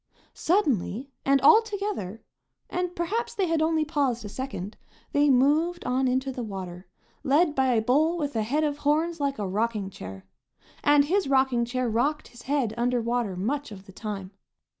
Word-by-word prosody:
Suddenly 275 - 0
and 275 0 +4
all 455 -1 +7
together, 405 - -4 0.5
and 360 0 -2
perhaps 460 +7 -2
they 390 - +1
had 330 -2 0
only 315 -1 +2
paused 275 -7 -1
a - - -6
second, 215 -5 -6 0.4
they 290 0 +3
moved 300 +7 +2
on 255 +1 +1
into 260 +2 0
the 255 - -5
water, 185 -4 -7 0.4
led 295 +4 +3
by 265 -2 +2
a 220 - +2
bull 310 +8 +2
with 290 -5 -3
a 220 - +1
head 280 +9 0
of 295 -1 -1
horns 315 +3 +1
like 280 -1 -1
a 205 - -2
rocking 210 0 -1
chair. 95 - -9 0.6
And 290 -1 +5
his 380 +4 +1
rocking 265 -3 +3
chair 255 +1 -2
rocked 265 +7 0
his 240 - -14
head 265 -6 0
under 245 +1 +1
water 235 -4 -1
much 260 +8 -2
of 195 -1 -10
the 195 - -13
time. 195 -3 -6
265 Hz, 180 wpm, -26 LUFS, 225-310 Hz, 0.6 s, all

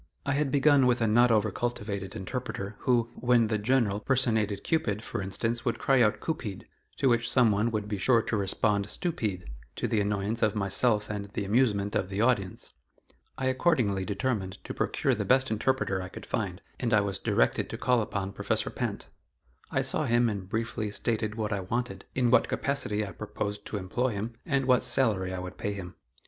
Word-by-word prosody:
I 140 - 0
had 145 0 +1
begun 140 -1 +4
with 125 0 +3
a 115 - +2
not 120 +3 +5
over 110 -2 +3
cultivated 105 -4 -3
interpreter, 105 -1 -4
who, 120 -2 +1
when 120 -3 +2
the 110 -1 0
General 105 -3 +2
personated 110 -5 +1
Cupid, 115 - 0
for - - -4
instance, 115 +5 -2
would 120 - 0
cry 135 -2 +3
out 105 -2 +3
"Coopeed," 115 - -4 0.3
to 135 - +2
which 120 -1 +2
some 120 -4 +4
one 105 +3 +1
would 105 -2 -2
be 105 -2 -3
sure 115 +2 +4
to 115 - -2
respond 100 0 +1
"Stoopeed," 110 - -2 0.3
to - - -1
the 110 - +1
annoyance 105 +2 -1
of 110 -1 +2
myself 105 +2 +2
and 100 -1 -5
the 100 - -2
amusement 105 -2 +2
of 95 - 0
the 95 +1 -3
audience. 110 -5 0 0.6
I 130 - -2
accordingly 130 - +2
determined 100 -1 -2
to - - -6
procure - - 0
the - - -1
best 130 -1 +3
interpreter 110 -3 0
I 90 - -6
could - - -9
find 100 -4 -3 0.2
and 120 -3 +2
I 105 - +5
was 100 -2 -2
directed - - +1
to - - -5
call 125 -2 +2
upon 100 -2 -3
Professor - - -1
Pinte. - - -4 0.6
I - - 0
saw - - 0
him 120 0 +3
and 100 -3 -5
briefly 110 -1 -2
stated 110 0 -1
what 110 -2 -2
I 100 - -1
wanted, 120 +7 -3
in 125 -2 +2
what 125 - +5
capacity 105 -7 -1
I 100 - -7
proposed 105 -1 -5
to 105 - -3
employ 115 +6 -1
him, 105 +4 -4
and 140 -4 +1
what 125 -1 +4
salary 100 -8 +1
I 95 - -4
would 90 0 -7
pay 105 - -2
him. 90 -3 -7
110 Hz, 195 wpm, -28 LUFS, 100-125 Hz, 0.6 s, not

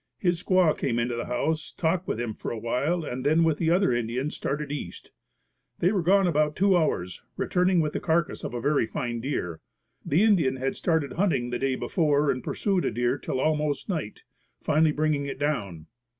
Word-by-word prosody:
His 175 -2 0
squaw 185 -4 +3
came 120 -3 -1
into 120 0 0
the 120 - -4
house, 155 +6 -1
talked 170 +2 0
with - - -2
him 120 -2 -2
for - - -6
a 115 - -4
while 140 +10 -1
and 125 -2 -4
then 155 +4 +3
with 160 -3 +1
the 160 - +1
other 175 -5 +3
Indians 120 +5 -2
started 145 +1 -3
east. 145 - -7 0.7
They 180 - +2
were 200 -4 +1
gone 195 +3 +4
about 150 -3 +1
two 195 0 +3
hours, 90 - 0 0.2
returning 180 -1 +2
with 150 -1 -2
the - - -1
carcass 165 -1 0
of - - -5
a - - -2
very 145 -3 +2
fine 120 +1 -3
deer. 90 - -3 0.4
The 160 +8 +2
Indian 170 -12 +3
had 130 +1 -2
started 160 -6 0
hunting 160 -10 0
the 120 - -2
day 135 -1 0
before 150 -2 +1
and 130 - -4
pursued 195 -3 0
a - - +1
deer 120 +4 0
till 130 - -3
almost 150 +1 0
night, 155 - -4 0.4
finally 155 +1 +2
bringing 150 -2 0
it 140 - -5
down. 105 - -2
150 Hz, 200 wpm, -26 LUFS, 125-170 Hz, 0.7 s, gone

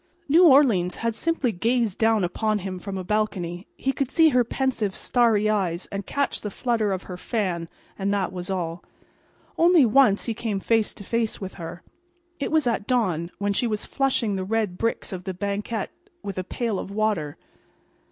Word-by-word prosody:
New 335 +5 +7
Orleans 235 - +5
had 230 - +1
simply 285 +1 0
gazed 225 +1 0
down 225 -2 +3
upon 215 +4 0
him 190 -2 -5
from 195 +1 -5
a 185 - -4
balcony. 185 -3 -2
He 270 - -1
could 275 -2 -1
see 320 +2 +5
her 250 -4 +3
pensive, 235 -5 -1
starry 225 -4 +2
eyes 190 -5 0
and 200 -1 -5
catch 280 0 -1
the 210 - -4
flutter 220 -1 0
of 190 -1 -2
her 180 - -7
fan, 180 -6 -2 0.3
and 195 +1 0
that 195 -2 -1
was 180 0 -6
all. 175 -2 -3 0.8
Only 335 -4 +6
once 235 -3 +4
he 230 - -1
came 220 -3 -2
face 225 +1 +1
to - - -10
face 230 +2 -1
with 190 -1 -6
her. 165 +1 -7 0.6
It 280 - -2
was 315 -3 +3
at 230 -4 -1
dawn, 180 -10 +1
when 205 0 0
she 240 - +1
was 215 -2 -2
flushing 255 -7 0
the 190 - -2
red 210 -2 -1
bricks 230 0 -2
of 180 -1 -6
the 190 -2 -4
banquette 200 +2 -3 0.3
with 195 -2 -4
a - - -2
pail 225 +1 -2
of - - -6
water. 200 -8 -1
210 Hz, 190 wpm, -24 LUFS, 185-235 Hz, 0.8 s, New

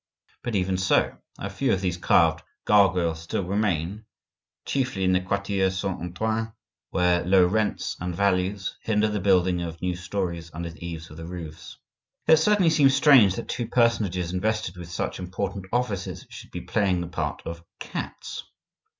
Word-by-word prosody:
But 120 - -3
even 95 -1 0
so, 95 - +2 0.2
a - - -4
few - - -1
of 95 - +1
these 90 -2 0
carved 80 -2 +3 0.2
gargoyles 90 -5 +3
still 85 +3 -2
remain, 100 +1 -1 0.6
chiefly 130 -8 -1
in 95 - +3
the 90 0 +3
quartier 100 0 0
Saint 95 -1 -3
Antoine, 110 +5 -2 0.4
where 90 -1 +2
low 90 0 +5
rents 105 +4 -1
and 90 0 -3
values 95 0 0
hinder 110 -1 +2
the 105 0 -1
building 90 -2 +3
of 85 -1 -5
new 90 0 -1
storeys 85 -2 -3
under 85 0 -4
the 85 - -13
eaves 85 -2 -6
of 75 - -11
the 80 0 -7
roofs. 80 -3 -8 0.5
It 160 - +7
certainly 185 0 +4
seems 140 -4 +5
strange 135 -9 +6
that - - -5
two 120 - -3
personages 100 -8 +1
invested 110 0 -1
with 90 -2 -9
such 85 - -3
important 95 +1 -4
offices 110 -6 -2
should - - -10
be - - -6
playing 95 -4 +1
the 85 - -4
part 85 - -3
of 85 0 -6 0.2
cats. - - -6
95 Hz, 165 wpm, -25 LUFS, 85-105 Hz, 0.6 s, It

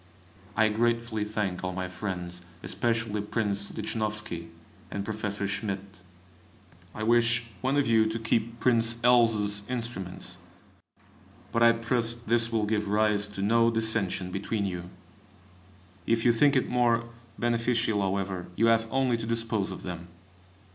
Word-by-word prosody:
I 110 0 +5
gratefully 115 0 0
thank 105 -4 -2
all 95 0 -2
my 90 0 -3
friends, 90 -2 -5 0.2
especially 115 +1 0
Prince 100 -1 -1
Lichnowsky 105 -5 -3 0.4
and 100 -1 -4
Professor 105 -2 -2
Schmidt. 100 -1 -4 0.9
I 110 - -4
wish 115 +1 +4 0.2
one 135 +2 +1
of 145 - +3
you 110 -1 +4
to 110 +1 -2
keep 115 0 -1
Prince 115 -2 +3
L 120 -1 +6
's 105 -2 -1
instruments; 115 -7 -4 1.1
but 115 - 0
I 115 0 +7
trust 115 0 -1
this 115 0 +3
will 110 -2 +1
give 105 -1 0
rise 105 0 +2
to 100 -1 -5
no 115 +3 +4
dissension 110 -5 0
between 100 +2 -2
you. 90 -2 -4 1.2
If 115 0 +1
you 120 - +7
think 140 +5 +4
it 130 - +2
more 120 -1 +2 0.3
beneficial, 115 -2 +1
however, 95 -2 -2
you 115 - +3
have 115 0 0
only 130 -2 +1
to 115 - -5
dispose 115 -3 -1
of - - -7
them. 85 -1 -6
110 Hz, 140 wpm, -28 LUFS, 100-115 Hz, 1.2 s, I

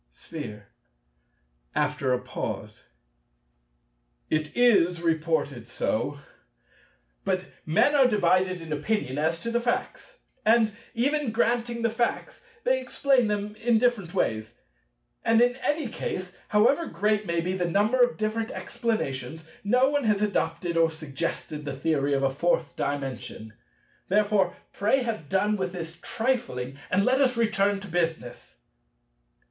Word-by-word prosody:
Sphere 105 - -8 1.1
(after 130 -2 0
a 125 - +2
pause). - - -6 1.5
It 155 +4 -1
is 200 -8 +4
reported 160 -7 0
so. 130 +4 -1 1.1
But 185 -1 0 0.2
men 160 - +4
are 275 -3 +6
divided 185 -4 +2
in 160 -2 -5
opinion 150 -3 -1
as 160 +2 +1
to 230 - -3
the 235 - +2
facts. 245 - -3 0.3
And 220 -1 +4 0.2
even 280 +2 +1
granting 235 +1 0
the 230 - +2
facts, 235 - -2 0.2
they - - +2
explain 265 -5 +2
them 210 0 -2
in 235 0 +2
different 220 -7 +1
ways. 110 -1 -1 0.7
And 225 0 +4
in 245 +1 +4
any 295 +1 -1
case, 185 -5 -4
however 235 +11 +3
great 210 0 0
may 170 0 0
be 180 +2 -1
the 180 -2 -1
number 210 +8 +2
of 245 -1 +3
different 220 +1 -1
explanations, 160 - -3 0.2
no 250 +6 +4
one 290 -3 0
has 210 -1 +2
adopted 170 -4 -1
or 165 0 +5
suggested 155 -1 -5
the 140 -2 -5
theory 145 -1 +1
of 135 - 0
a 135 - +2
Fourth 160 +2 0
Dimension. 130 -5 -4 0.5
Therefore, 205 -2 +2 0.2
pray 225 +6 +2
have 215 -11 -4
done 205 +2 +2
with 185 -2 -2
this 165 -1 -6
trifling, 145 - -2
and 195 +2 +2
let 260 +2 +3
us 255 -3 +3
return 205 -3 +2
to 200 - -8
business. 160 - -3
195 Hz, 135 wpm, -27 LUFS, 160-235 Hz, 1.5 s, are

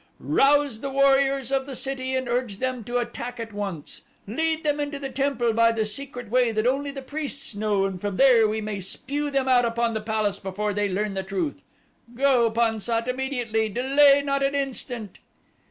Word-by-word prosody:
Rouse 280 -4 +2
the 275 - -3
warriors 275 -1 +3
of 270 0 0
the 270 - -6
city 260 0 -2
and 260 -1 -1
urge 240 -4 -1
them 255 -1 -2
to 240 +2 -1
attack 240 0 -4
at 225 -2 -6
once. 195 -7 -5 0.2
Lead 320 +9 -1
them 295 -1 +1
into 290 0 -3
the 275 -1 -6
temple 265 -4 0
by 230 +1 +4
the 225 -1 -1
secret 245 +1 -6
way 250 -1 +3
that 215 0 -1
only 275 +3 +1
the 275 -1 -7
priests 280 -2 -4
know 205 -1 0
and 190 -2 -4
from 205 -2 -3
here 245 -5 +6
we 215 +1 -2
may 210 -2 -4
spew 280 +10 -3
them 270 -2 0
out 250 -1 +5
upon 235 0 0
the 220 - -2
palace 215 -2 -1
before 205 +2 -3
they 205 0 0
learn 200 +2 -1
the 190 - -2
truth. 195 +10 -3 0.5
Go, 255 -3 +3
Pan 225 -1 +1
sat, 230 +2 -1
immediately 245 -4 -1
delay 275 +5 +4
not 275 -1 0
an 275 +1 +1
instant." 245 -6 -3
245 Hz, 195 wpm, -25 LUFS, 215-275 Hz, 0.5 s, here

